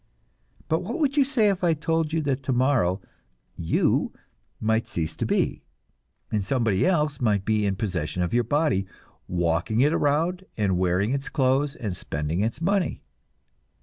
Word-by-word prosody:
But 160 - +1
what 215 +7 -4
would 290 -3 +1
you 290 - +5
say 250 -6 +2
if 190 -2 -1
I 170 -2 +3
told 160 0 0
you 160 0 0
that 135 -2 -1
tomorrow 125 -8 +1 0.6
"you" 80 - +1 0.5
might 110 +1 +1
cease 80 -2 -3
to - - -1
be, - - 0 0.7
and 105 -2 0
somebody 115 - +1
else 150 -6 +1
might 105 -5 +1
be 105 -1 +1
in 100 - 0
possession 90 -5 -2
of 90 - -2
your 120 0 +3
body, 120 -7 +1 0.4
walking 85 +5 0
it 145 +4 +4
around 165 +6 +1
and 95 -4 +1
wearing 95 +6 +1
its 140 0 -3
clothes 135 0 +1
and 105 -6 -4
spending 75 +3 -3
its 115 +5 -1
money? 190 +2 0
125 Hz, 160 wpm, -25 LUFS, 95-160 Hz, 0.7 s, you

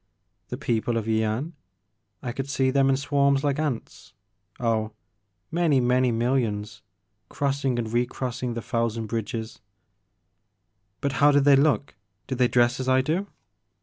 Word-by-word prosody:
"The - - -4
people 115 0 -1
of 110 - -2
Yian? 110 +7 0 0.7
I 125 - -3
could 135 +3 -5
see 130 -1 +1
them 135 0 +3
in 135 - +3
swarms 140 0 +2
like 145 0 0
ants 145 -7 -4 0.2
— 100 +2 -36
oh 115 -2 +1
I - - -10 0.6
many, 165 -5 +2
many 125 0 +2
millions 115 -3 -1 0.5
crossing 140 -3 -1
and 115 -2 -2
recrossing 125 0 -2
the 115 - -4
thousand 115 -1 -1
bridges.'* 110 +1 -4 0.7
" 95 0 -49
But 140 - 0
how 145 - +7
did 145 -1 +4
they 140 0 +6
look? 140 0 +2 0.3
Did 130 -2 -4
they 125 - +5
dress 120 +1 +2
as 130 0 -2
I 130 0 +4
do?" 165 +9 -1
125 Hz, 155 wpm, -25 LUFS, 115-140 Hz, 0.7 s, how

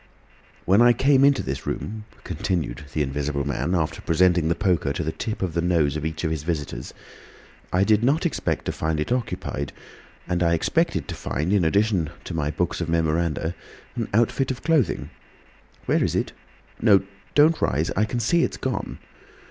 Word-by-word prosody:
"When 100 +5 +5
I 120 0 +7
came 135 +3 +4
into 140 0 +4
this 65 0 -5
room," 110 0 -4 0.2
continued 80 -7 -3
the 75 - 0
Invisible 70 +1 -2
Man, 85 +6 -1
after 80 -3 -1
presenting 85 0 +3
the 85 - +1
poker 90 -7 +1
to 75 - -2
the 80 - -1
tip 110 +1 -4
of 90 -3 -2
the 85 - 0
nose 85 -4 +2
of 75 - -3
each 80 +1 -3
of 80 - 0
his 80 -3 -2
visitors, 75 -6 -4 0.8
"I 90 +1 +3
did 105 +2 +3
not 150 +8 +2
expect 170 - -1
to - - -1
find 80 0 -2
it 75 - -2
occupied, 115 - -2 0.5
and 90 0 -1
I 85 -1 +3
expected 80 - 0
to - - -4
find, 80 +8 -2
in 100 -4 +3
addition 95 -1 +2
to - - -6
my 75 -2 -1
books 90 +3 -1
of 85 - -2
memoranda, 80 0 0 0.4
an - - -2
outfit 120 +4 +2
of 130 -1 -4
clothing. 155 -6 +1 0.7
Where - - +2
is - - 0
it? - - -1 0.5
No—don't 105 +10 +3
rise. 75 +5 +1
I 105 - +3
can 120 +3 -3
see 150 +10 +2
it's - - -1
gone. 130 -1 -3
85 Hz, 180 wpm, -24 LUFS, 80-110 Hz, 0.8 s, I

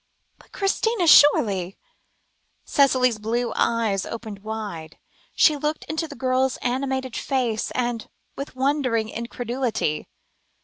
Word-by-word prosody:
"But - - -22
Christina 395 0 0
surely!" 200 - +5 0.9
Cicely's 255 -5 +3
blue 235 +3 -1
eyes 220 -4 +1
opened 220 -3 -7
wide, 205 -7 -6 0.4
she 305 - +5
looked 300 +2 -2
into 320 +1 -3
the - - -10
girl's 255 0 0
animated 260 0 -2
face, 245 -5 -1 0.6
with 275 -1 -7
wondering 260 -5 0
incredulity. 235 - -3
245 Hz, 100 wpm, -23 LUFS, 220-275 Hz, 0.9 s, surely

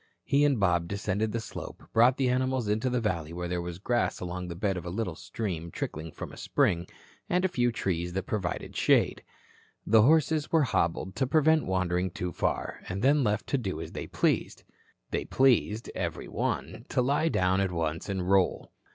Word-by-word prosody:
He 140 +1 +3
and 140 -5 +2
Bob 90 -3 +2
descended 100 +2 -1
the 115 - -1
slope, 110 - -8
brought 120 +3 +5
the 135 - +2
animals 130 -2 0
into 110 +5 +1
the 125 0 +1
valley 85 -8 -2
where 90 0 -4
there 90 0 -2
was 85 0 -5
grass 120 +5 0
along 90 0 -4
the 85 - -6
bed 95 +1 0
of 90 - -5
a 90 - -5
little 95 -1 -2
stream 85 -1 -4
trickling 80 0 -5
from - - -7
a - - -11
spring, 85 +1 +1 0.4
and 180 +1 +2
a - - +5
few 120 -10 +1
trees 90 -5 -2
that 95 +1 -1
provided 95 -3 -3
shade. - - +3 0.6
The 110 +1 +6
horses 155 +3 +3
were 160 -2 +4
hobbled 95 -5 0
to 130 - +1
prevent 155 +2 +3
wandering 95 0 0
too 90 0 -4
far, - - -2
and 95 +3 -3
then 140 +1 +4
left 105 -1 0
to 140 - +1
do 100 -6 -3
as - - -6
they - - -6
pleased. - - 0 0.5
They - - -1
pleased, 120 -4 +2
every - - -3
one, - - -3
to 125 - +1
lie 145 +5 +2
down 95 -5 +2
at 95 -2 0
once 80 +1 -2
and 95 -2 -2
roll. 95 -1 +2
100 Hz, 195 wpm, -28 LUFS, 90-125 Hz, 0.6 s, The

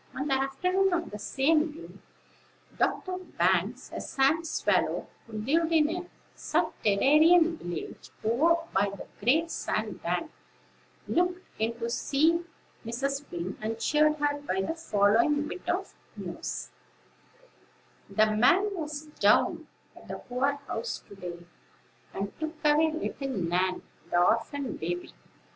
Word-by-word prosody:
On 275 +3 -2
the 275 - +1
afternoon 365 +8 +1
of 345 -1 -1
the 210 - -6
same 305 +7 +2
day, 330 - -11 0.9
Dr. 365 -1 0
Banks, 370 - 0
a - - -4
sand 310 +5 +1
swallow, - - +1 0.2
who 230 - -14
lived 305 +10 +1
in 320 0 +3
a 355 0 -5 0.3
subterranean 315 - +4
village 175 - -6
over 275 +10 +4 0.2
by 200 +1 +3
the 200 -1 -8 0.2
great 320 +8 +3
sand - - -2
bank, - - -2 0.8
looked 360 +1 0
in 230 +1 -1
to 230 -1 -3
see 310 +7 +2 0.4
Mrs. 275 +5 -3
Wing, 175 +2 -4
and 220 +1 -2
cheered 300 +4 +3
her 290 -1 0
by 190 -9 -1
the 195 - -1
following 235 +1 +2
bit 360 +2 -7
of 375 +2 -1 0.2
news: - - -5 1.4
"The 215 - +4
man 365 - +4
was 305 -3 -4
down 300 +4 +2 0.3
at - - -15
the - - -5
poor 260 +3 0
house 225 - -4
to 200 - -11
day, 175 -2 -8 0.7
and 200 +1 -4
took 315 +1 -3
away 305 +2 +4
little 300 -3 -4
Nan, 185 -4 0 0.3
the 175 - +3
orphan 235 +8 +1
baby. 175 +2 -4
285 Hz, 135 wpm, -28 LUFS, 215-325 Hz, 1.4 s, subterranean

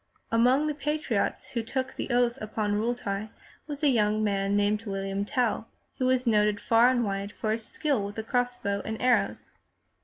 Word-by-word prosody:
Among 250 +6 +4
the 305 - 0
patriots 300 +2 -1
who 235 - -2
took 260 +3 -3
the - - -4
oath 240 -1 +2
upon 215 -1 -2
Riitli 215 -2 -2 0.4
was 290 0 -6
a - - +5
young 215 -3 +2
man 200 -1 +1
named 205 +1 +1
William 195 0 -2
Tell, 240 -3 0 0.3
who 255 - +2
was 255 0 +2
noted 210 -2 +3
far 230 +3 +5
and 250 -2 +2
wide 200 0 -3
for 215 0 -2
his 220 0 -3
skill 280 -9 0
with 205 - -8
the 220 - -4
cross 245 +2 0
bow 200 -4 -2
and 220 0 -4
arrows. 250 0 +1
225 Hz, 185 wpm, -28 LUFS, 205-250 Hz, 0.4 s, a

